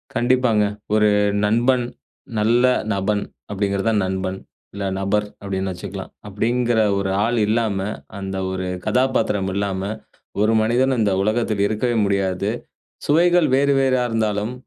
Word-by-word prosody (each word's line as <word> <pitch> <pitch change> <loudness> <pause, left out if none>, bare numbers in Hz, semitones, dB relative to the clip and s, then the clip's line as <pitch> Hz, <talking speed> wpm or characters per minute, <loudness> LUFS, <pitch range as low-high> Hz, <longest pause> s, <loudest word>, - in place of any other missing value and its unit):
கண்டிப்பாங்க. 120 -3 +2 0.3
ஒரு 105 0 +4 0.4
நண்பன், 120 +3 +2 0.5
'நல்ல 115 +3 +3 0.3
நபன்' 100 +1 0 0.3
அப்டிங்கிறது 100 +1 -1
தான் 105 -2 +2
நண்பன். 95 0 -3 0.3
இல்ல 100 - -5
நபர் 100 +2 0 0.2
அப்படின்னு 95 -1 -3
வச்சுக்கலாம். 95 +1 -7 0.2
அப்டிங்கிற 115 +3 0 0.2
ஒரு 95 -1 -1 0.2
ஆள் 120 +1 0
இல்லாம, 110 -2 +1 0.4
அந்த 95 0 -5 0.2
ஒரு 95 0 -3 0.2
கதாபாத்திரம் 110 -7 +1
இல்லாம, 100 -1 -2 0.6
ஒரு 110 +1 +3
மனிதன் 125 +3 +2
இந்த 105 -3 +2
உலகத்துக்கு 110 -1 +1
இருக்கவே 120 +3 0
முடியாது. 100 0 0 0.6
சுவைகள் 175 +3 +4
வேறு 140 +1 +3
வேறா 130 -2 +2
இருந்தாலும், 110 -1 -1
105 Hz, 125 wpm, -21 LUFS, 100-120 Hz, 0.6 s, ஒரு